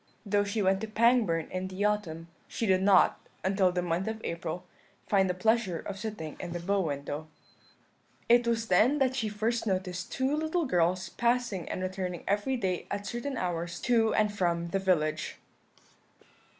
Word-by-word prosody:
Though 205 Hz, 0 st, +2 dB
she 205 Hz, +1 st, -1 dB
went 190 Hz, +1 st, +2 dB
to 220 Hz, -, -3 dB
Pangbourne 215 Hz, -7 st, +3 dB
in 185 Hz, 0 st, -3 dB
the 190 Hz, +2 st, -2 dB
autumn, 170 Hz, -6 st, -1 dB, 0.2 s
she 230 Hz, -, -3 dB
did 190 Hz, -2 st, +3 dB
not, 195 Hz, -1 st, +5 dB, 0.2 s
until 190 Hz, -1 st, +3 dB
the 180 Hz, 0 st, -1 dB
month 175 Hz, +3 st, -1 dB
of 220 Hz, 0 st, -3 dB
April, 170 Hz, +1 st, -4 dB, 0.4 s
find 195 Hz, -2 st, +3 dB
the 180 Hz, -, 0 dB
pleasure 220 Hz, -2 st, +1 dB
of 195 Hz, +3 st, -6 dB
sitting 210 Hz, -8 st, -5 dB
in 175 Hz, -1 st, -5 dB
the 175 Hz, -, -3 dB
bow 195 Hz, +3 st, +1 dB
window. 145 Hz, -1 st, -4 dB, 1.0 s
"It 240 Hz, 0 st, +5 dB
was 230 Hz, -1 st, 0 dB
then 225 Hz, +10 st, +4 dB
that 260 Hz, -2 st, +2 dB
she 225 Hz, -5 st, -1 dB
first 225 Hz, +3 st, -1 dB
noticed 185 Hz, -2 st, -2 dB
two 265 Hz, +2 st, 0 dB
little 315 Hz, +2 st, 0 dB
girls 180 Hz, -4 st, +1 dB
passing 235 Hz, -6 st, 0 dB
and 185 Hz, -, -3 dB
returning 185 Hz, -2 st, -3 dB
every 205 Hz, +7 st, +1 dB
day 185 Hz, -6 st, -2 dB
at 200 Hz, 0 st, -3 dB
certain 240 Hz, +6 st, -4 dB
hours 175 Hz, -2 st, -3 dB
to 230 Hz, -3 st, +3 dB
and 210 Hz, -1 st, +2 dB
from 170 Hz, -3 st, 0 dB
the 195 Hz, -, 0 dB
village. 155 Hz, -5 st, 0 dB
195 Hz, 175 wpm, -29 LUFS, 180-225 Hz, 1.0 s, not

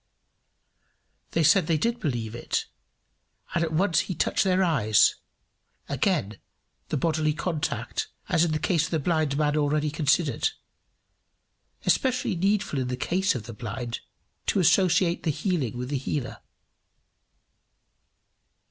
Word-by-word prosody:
They 165 Hz, -, +2 dB
said 160 Hz, +3 st, +5 dB
they 165 Hz, -2 st, +2 dB
did 235 Hz, +9 st, 0 dB
believe 120 Hz, -, -2 dB
it, 120 Hz, -, -2 dB, 0.9 s
and 170 Hz, -, +1 dB
at 160 Hz, -, -2 dB
once 175 Hz, +2 st, +2 dB
he 185 Hz, -, -2 dB
touched -, -, +1 dB
their 190 Hz, 0 st, +2 dB
eyes 120 Hz, -, +4 dB, 0.7 s
again 100 Hz, 0 st, -1 dB, 0.5 s
the 150 Hz, -, 0 dB
bodily 155 Hz, +1 st, +1 dB
contact, 165 Hz, -1 st, -2 dB, 0.2 s
as 165 Hz, -, +3 dB
in 170 Hz, -, +1 dB
the 155 Hz, -, +1 dB
case 165 Hz, 0 st, +1 dB
of -, -, -6 dB
the 165 Hz, -, 0 dB
blind 155 Hz, -2 st, 0 dB
man 150 Hz, -1 st, +1 dB
already 150 Hz, 0 st, +1 dB
considered 150 Hz, -, +1 dB, 1.4 s
especially 255 Hz, -6 st, +1 dB
needful 195 Hz, -3 st, 0 dB
in 130 Hz, -, -1 dB
the 125 Hz, 0 st, -3 dB
case 190 Hz, +7 st, +1 dB
of 120 Hz, -, -4 dB
the 115 Hz, -, -8 dB
blind, 115 Hz, +1 st, -5 dB, 0.5 s
to -, -, +2 dB
associate 180 Hz, 0 st, +3 dB
the 165 Hz, -, -1 dB
healing 150 Hz, -, -1 dB
with 125 Hz, +1 st, -4 dB
the 140 Hz, -2 st, -1 dB
healer. 135 Hz, -1 st, -4 dB
155 Hz, 135 wpm, -26 LUFS, 135-180 Hz, 1.4 s, said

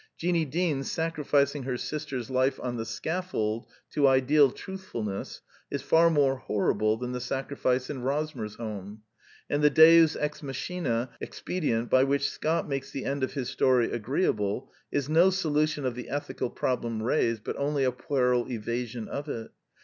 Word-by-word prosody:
Jeanie 170 Hz, -1 st, +1 dB
Deans 150 Hz, -2 st, -1 dB
sacrificing 150 Hz, -3 st, +1 dB
her 130 Hz, -1 st, -2 dB
sister's 140 Hz, -5 st, -4 dB
life 130 Hz, +1 st, +1 dB
on 125 Hz, -1 st, -2 dB
the 115 Hz, -1 st, -3 dB
scaflold 120 Hz, -5 st, -2 dB, 0.2 s
to 140 Hz, -2 st, +3 dB
ideal 135 Hz, +2 st, +5 dB
truthfulness 120 Hz, -, -6 dB, 0.3 s
is 140 Hz, -1 st, -3 dB
far 165 Hz, +3 st, +5 dB
more 140 Hz, -4 st, +3 dB
horrible 110 Hz, -1 st, +1 dB
than 125 Hz, +1 st, -4 dB
the 125 Hz, 0 st, -3 dB
sacri 135 Hz, +3 st, -3 dB
fice 130 Hz, -1 st, +1 dB
in 140 Hz, -4 st, -5 dB
Rosmersholm; 110 Hz, -7 st, -4 dB, 0.5 s
and 145 Hz, +1 st, 0 dB
the 150 Hz, -, +7 dB
deus 160 Hz, +1 st, +7 dB
ex 150 Hz, 0 st, -3 dB
machina 135 Hz, -4 st, -2 dB
expedient 120 Hz, -10 st, -2 dB
by 130 Hz, -, +6 dB
which 140 Hz, +1 st, +1 dB
Scott 160 Hz, +2 st, -1 dB
makes 135 Hz, -1 st, -3 dB
the 135 Hz, -1 st, -5 dB
end 140 Hz, 0 st, -1 dB
of 130 Hz, -, -1 dB
his 130 Hz, -3 st, -3 dB
story 125 Hz, -3 st, +2 dB
agreeable 115 Hz, -, -1 dB, 0.2 s
is 140 Hz, -2 st, 0 dB
no 165 Hz, +5 st, +5 dB
solution 155 Hz, -5 st, 0 dB
of 125 Hz, -, 0 dB
the 125 Hz, 0 st, -7 dB
ethical 145 Hz, -3 st, -3 dB
prob 125 Hz, +1 st, -1 dB
lem 115 Hz, -2 st, -3 dB
raised, 115 Hz, -3 st, +1 dB
but -, -, -3 dB
only 140 Hz, 0 st, 0 dB
a 130 Hz, -, +3 dB
puerile 125 Hz, -1 st, 0 dB
evasion 120 Hz, 0 st, -3 dB
of 145 Hz, +1 st, -5 dB
it. 115 Hz, -4 st, -5 dB
135 Hz, 165 wpm, -28 LUFS, 120-150 Hz, 0.5 s, the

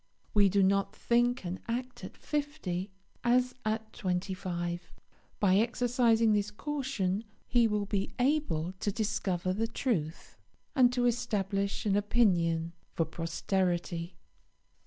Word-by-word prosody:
We 205 Hz, -2 st, +5 dB
do 195 Hz, +1 st, +3 dB
not 195 Hz, +1 st, +2 dB
think 240 Hz, -1 st, +1 dB
and 180 Hz, +2 st, -3 dB
act 250 Hz, +2 st, -4 dB
at -, -, -8 dB
fifty 285 Hz, -, -3 dB, 0.3 s
as 250 Hz, +1 st, +3 dB
at 220 Hz, 0 st, -2 dB
twenty 185 Hz, +1 st, -2 dB
five. 175 Hz, -2 st, -4 dB, 0.5 s
By 190 Hz, -2 st, +4 dB
exercising 230 Hz, -1 st, +3 dB
this 205 Hz, 0 st, +1 dB
caution 225 Hz, -5 st, -2 dB, 0.2 s
he 235 Hz, -2 st, +4 dB
will 210 Hz, -1 st, 0 dB
be 200 Hz, -1 st, -1 dB
able 250 Hz, -, +1 dB
to 205 Hz, -, 0 dB
discover 185 Hz, -4 st, -1 dB
the 225 Hz, +4 st, 0 dB
truth, 200 Hz, -, -3 dB, 0.4 s
and 250 Hz, -3 st, +6 dB
to 250 Hz, -1 st, +1 dB
establish 200 Hz, -5 st, 0 dB
an 200 Hz, -2 st, +2 dB
opinion 175 Hz, -6 st, +2 dB, 0.2 s
for 165 Hz, -, +2 dB
posterity. 170 Hz, +1 st, -2 dB
205 Hz, 125 wpm, -31 LUFS, 180-240 Hz, 0.5 s, and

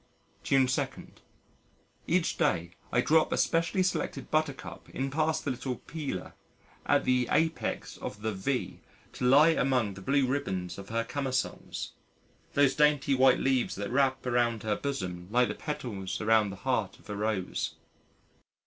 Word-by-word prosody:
June 135 Hz, -1 st, +3 dB
2. 125 Hz, -, +1 dB, 1.2 s
Each 170 Hz, 0 st, +1 dB
day 85 Hz, -1 st, +1 dB, 0.2 s
I 120 Hz, -, +3 dB
drop 155 Hz, +3 st, +3 dB
a -, -, +1 dB
specially 170 Hz, +3 st, +2 dB
selected 145 Hz, -7 st, -2 dB
Buttercup 155 Hz, -3 st, -2 dB
in 135 Hz, +1 st, -3 dB
past 155 Hz, +2 st, 0 dB
the 145 Hz, -, 0 dB
little 130 Hz, 0 st, -3 dB
"Peeler," 140 Hz, -, -6 dB, 0.5 s
at -, -, +3 dB
the 125 Hz, -1 st, +2 dB
apex 160 Hz, +1 st, 0 dB
of 105 Hz, +1 st, -7 dB
the 110 Hz, -, 0 dB
"V" 125 Hz, +7 st, -2 dB, 0.3 s
to -, -, -3 dB
lie 145 Hz, +6 st, +7 dB
among 125 Hz, -9 st, +1 dB
the 95 Hz, -, -10 dB
blue 140 Hz, +6 st, +2 dB
ribbons 95 Hz, -10 st, -2 dB
of 100 Hz, -, -10 dB
her 115 Hz, +1 st, 0 dB
camisoles 130 Hz, +1 st, -3 dB, 0.6 s
those 140 Hz, -2 st, +5 dB
dainty 150 Hz, -2 st, +3 dB
white 130 Hz, -1 st, +5 dB
leaves 130 Hz, -2 st, +1 dB
that 100 Hz, +1 st, -4 dB
wrap 130 Hz, 0 st, +2 dB
around 120 Hz, -3 st, +1 dB
her 105 Hz, -1 st, 0 dB
bosom 95 Hz, -11 st, -4 dB
like 125 Hz, +2 st, +3 dB
the -, -, -1 dB
petals 105 Hz, -11 st, -4 dB
around 110 Hz, -1 st, +3 dB
the 100 Hz, -, -6 dB
heart 110 Hz, -7 st, 0 dB
of -, -, -20 dB
a 105 Hz, -, -4 dB
Rose. 105 Hz, -3 st, -2 dB
130 Hz, 155 wpm, -29 LUFS, 105-140 Hz, 1.2 s, lie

